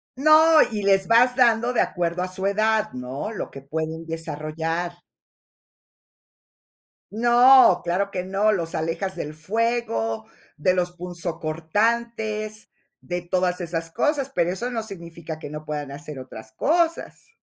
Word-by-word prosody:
No, 310 +3 +6
y 210 -1 -2
les 195 -1 +3
vas 245 +2 +5
dando 240 -1 +3
de - - +3
acuerdo 175 0 -1
a - - -2
su 190 +1 -5
edad, 215 +1 +1
¿no? 130 - -5
Lo 215 - -5
que 135 - -10
pueden 160 +3 -4
desarrollar. 165 +2 -4 2.1
No, 240 -3 +6
claro 195 +3 0
que 180 -1 -3
no, 200 +3 +2
los 170 -4 -2
alejas 165 +4 -2
del 155 -3 -5
fuego, 155 - -1 0.3
de 180 +5 +2
los 180 -1 0
punzocortantes, 210 +6 -2 0.3
de 175 0 -4
todas 180 0 -1
esas 165 -1 -4
cosas, 290 - 0
pero 175 0 +2
eso 235 +7 -3
no 225 -2 -3
significa 170 -5 -8
que 145 - -8
no 150 0 -7
puedan 145 -2 -4
hacer 145 -1 -8
otras 110 -4 -10
cosas. 335 - -1
180 Hz, 135 wpm, -23 LUFS, 160-225 Hz, 2.1 s, No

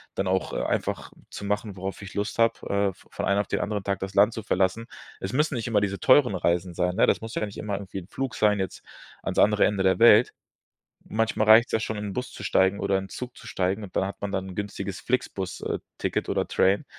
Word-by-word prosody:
dann 95 - -1
auch, 95 0 0
äh, - - -1
einfach - - -2 0.2
zu - - -8
machen, 105 0 -2
worauf 95 +2 -5
ich 100 - -9
Lust 105 +3 -3
habe, 115 0 +5 0.2
äh, 100 -1 +1
v - - -23
von - - -3
einen 100 0 +2
auf 100 - -8
den - - -1
anderen 105 -1 -2
Tag 100 0 -1
das 95 0 -5
Land 105 +3 +5
zu 110 - -6
verlassen. 95 +5 0 0.3
Es 95 - -5
müssen 150 +1 +1
nicht 115 0 -3
immer 105 -3 +2
diese 100 -2 -2
teuren 130 -4 +5
Reisen 85 0 0
sein, 90 +1 0
ne? 115 - +5
Das - - +2
muss 110 0 -7
ja - - -1
dann 110 - -1
nicht - - -12
immer 105 -1 -4
irgendwie 100 -1 -7
'n 85 - -12
Flugschein 110 -4 0
jetzt 95 - -4 0.4
ans - - -3
andere 105 0 +5
Ende 100 -2 0
der 95 +3 +3
Welt. 115 0 +7 0.8
Manchmal 110 -1 0
reicht's 115 +2 +7
ja - - +3
schon, 110 - -3
in 105 - -4
'n 100 - -4
Bus 125 0 -4
zu - - -9
steigen 95 0 +2
oder 100 -1 +1
in 95 - -5
'n - - -19
Zug 125 -1 -7
zu - - -13
steigen, 95 +3 -1
und 95 - -11
da - - +2
hat 100 - -7
man 100 -1 -3
dann 95 -1 -2
'n 90 - -9
günstiges 100 -1 -4
Flixbus 100 -7 -2
äh, - - -2 0.2
Ticket - - -2
oder - - 0
Train. 95 +2 +2
100 Hz, 260 wpm, -26 LUFS, 95-110 Hz, 0.8 s, Welt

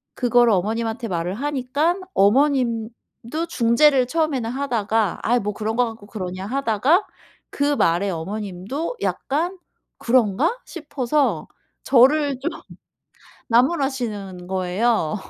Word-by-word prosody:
그거를 245 -2 +3
어머님한테 225 +4 -1
말을 175 0 -2
하니깐 290 - -1
어머님도 240 +4 0
중재를 250 +2 +3
처음에는 295 -7 -1
하다가 225 -6 -1
아이 245 +2 +2
뭐 210 -1 -3
그런 220 +1 -3
거 245 +1 +3
갖고 225 -3 -9
그러냐 185 -2 -6
하다가 275 - +2 0.5
그 285 0 +1
말에 180 -2 +2
어머님도 200 - -4
약간 340 +7 -1 0.4
'그런가?' 255 - +2
싶어서 290 -3 -1 0.4
저를 275 +1 +4
좀 310 +6 -2 1.0
나무라시는 235 - 0
거예요. 190 0 0
240 Hz, 265 characters per minute, -22 LUFS, 210-280 Hz, 1.0 s, 저를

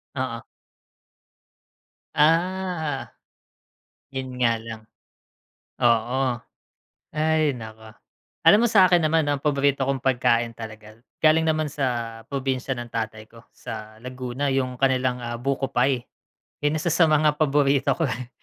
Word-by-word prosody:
Oo. 130 -3 -3 1.7
Ah, 165 -1 +1 1.0
yun 130 -1 -5
nga 115 -2 +3
lang. 115 -1 -8 1.0
Oo, 120 +2 +2 0.7
ay 155 -1 +2
naku. 110 -2 -10 0.5
Alam 215 +3 +6
mo - - +3
sa'kin 185 -4 +6
naman 155 0 +2
'no, 145 - +1
ang 140 - -13
paborito 140 -2 +2
kong 135 0 -1
pagkain 120 -3 +1
talaga, 110 -1 -10 0.2
galing 160 +1 +4
naman 155 -1 +1
sa 120 -5 -3
probinsya 135 0 -2
ng 120 -2 -5
tatay 110 -1 -5
ko 115 0 -17
sa 110 -2 -9
Laguna, 125 +2 -4
yung 130 -2 -1
kanilang, 130 -2 +1
ah, 120 0 -4
buko 135 +2 -2
pie. 130 -1 0 0.5
'Yan 145 +1 +1
isa 165 +2 -1
sa 165 0 +4
mga 150 0 +3
paborito 140 -2 +3
ko, 165 - 0
eh. 125 -2 -4
130 Hz, 125 wpm, -24 LUFS, 120-150 Hz, 1.7 s, Alam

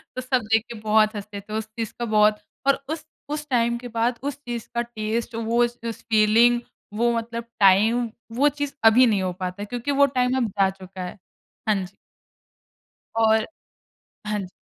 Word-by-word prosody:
तो 255 - -3
सब 255 0 +1
देख 225 - +4
के 235 - -6
बहुत 215 0 +3
हँसते 205 0 -6
थे। 210 +2 -10
उस 220 - -3
चीज़ 225 -2 -3
का 240 - -1
बहुत 210 0 +4 0.3
और 275 0 +3
उस 315 -1 -4 0.2
उस 300 0 -4
टाइम 235 -1 +2
के 245 0 -8
बाद 235 +1 -1
उस 285 -1 -3
चीज़ 240 -2 -5
का 235 - +2
टेस्ट, 230 0 -3
वो 230 +1 +2
स 240 0 -14
उस 230 - -5
फीलिंग, 225 +3 +5 0.3
वो 235 +2 +2
मतलब 230 0 -4 0.2
टाइम 220 +5 +4 0.3
वो 285 +4 +4
चीज़ 290 -1 -2
अभी 235 +3 +7
नहीं 205 -4 +2
हो 185 -1 -1
पाता 185 +2 -4
है - - -3
क्योंकि 245 +5 -3
वो 280 - +9
टाइम 250 +1 +2
अब 240 - +1
जा 195 - +5
चुका 190 -1 -10
है। 180 - -7 0.5
हाँ 215 - +4
जी। 180 - -15 1.2
और 220 -1 +4 0.8
हाँ 210 -1 -1
जी। - - -13
230 Hz, 195 wpm, -24 LUFS, 210-240 Hz, 1.2 s, वो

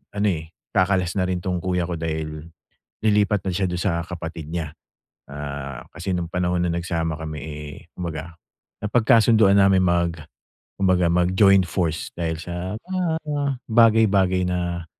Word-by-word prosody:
ano, 105 +1 +1
eh, 80 +1 -11 0.2
kakalas 95 -1 +1
na 90 - +2
rin 90 -1 -2
'tong 90 -1 -1
kuya 90 0 -1
ko 85 - -2
dahil 80 -1 -4 0.6
lilipat 105 -2 +2
na - - +1
siya 95 -1 0
dun 90 - -2
sa 85 -3 0
kapatid 80 -3 -7
niya. 80 -3 -3 0.6
Ah, 70 -2 -6
kasi 85 +4 -4
nung 85 -1 -3
panahon 90 -1 0
na 90 - 0
nagsama 85 -2 -2
kami, 80 -1 -5
eh, 75 -1 -7 0.2
kumbaga 85 -1 -5 0.5
napagkasununduan 110 -2 +4
namin 95 -1 +5
mag 85 -1 +2 0.7
kumbaga 90 -2 +3
mag-join 95 +3 +4
force 80 -3 -2
dahil 80 -1 -1
sa 90 +3 -5
mga 185 -1 -2 0.6
bagay-bagay 105 -5 +4
na 85 -1 -2
90 Hz, 145 wpm, -23 LUFS, 80-95 Hz, 0.7 s, namin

